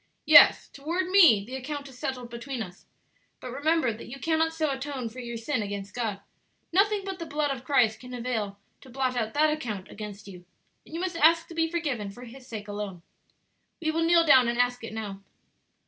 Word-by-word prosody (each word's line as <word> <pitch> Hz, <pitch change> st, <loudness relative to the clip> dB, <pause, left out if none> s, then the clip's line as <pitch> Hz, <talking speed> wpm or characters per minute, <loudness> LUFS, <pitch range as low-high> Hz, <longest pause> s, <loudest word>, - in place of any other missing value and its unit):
"Yes, -, -, +8 dB
toward 340 Hz, +6 st, -3 dB
me; 330 Hz, -, +6 dB
the 255 Hz, +4 st, -7 dB
account 280 Hz, +2 st, -5 dB
is 255 Hz, -2 st, -14 dB
settled 250 Hz, -3 st, -4 dB
between 240 Hz, 0 st, -5 dB
us; 180 Hz, -1 st, -13 dB, 0.5 s
but 250 Hz, -, -7 dB
remember 285 Hz, -2 st, +1 dB
that 215 Hz, -, -10 dB
you 275 Hz, +3 st, -9 dB
cannot 320 Hz, +2 st, +1 dB
so 315 Hz, -2 st, -1 dB
atone 265 Hz, -3 st, -4 dB
for 245 Hz, +3 st, -11 dB
your 235 Hz, -1 st, -5 dB
sin 230 Hz, +2 st, -2 dB
against 200 Hz, -1 st, -5 dB
God; 220 Hz, -5 st, -3 dB, 0.5 s
nothing 405 Hz, +2 st, +3 dB
but 385 Hz, -1 st, -5 dB
the 335 Hz, -, -5 dB
blood 295 Hz, -1 st, -1 dB
of 240 Hz, -, -11 dB
Christ 240 Hz, -5 st, +2 dB
can 250 Hz, 0 st, -11 dB
avail 225 Hz, -5 st, -3 dB, 0.2 s
to 265 Hz, -, -15 dB
blot 255 Hz, 0 st, -1 dB
out 225 Hz, -1 st, -2 dB
that 305 Hz, +1 st, +4 dB
account 215 Hz, -11 st, -5 dB
against 205 Hz, -1 st, -8 dB
you, 180 Hz, -3 st, -11 dB, 0.4 s
and 320 Hz, -, -9 dB
you -, -, -3 dB
must 360 Hz, -2 st, -3 dB
ask 330 Hz, +1 st, +4 dB
to -, -, -8 dB
be 325 Hz, 0 st, 0 dB
forgiven 285 Hz, -12 st, -2 dB
for 240 Hz, +5 st, -11 dB
His 250 Hz, +2 st, -12 dB
sake 215 Hz, -4 st, -7 dB
alone. 205 Hz, -4 st, -6 dB, 0.8 s
We 315 Hz, -1 st, 0 dB
will 325 Hz, +1 st, -1 dB
kneel 335 Hz, 0 st, +5 dB
down 260 Hz, -5 st, +6 dB
and 235 Hz, 0 st, -1 dB
ask 245 Hz, 0 st, +1 dB
it 225 Hz, -, -6 dB
now." 205 Hz, -3 st, -6 dB
255 Hz, 210 wpm, -27 LUFS, 220-315 Hz, 0.8 s, Yes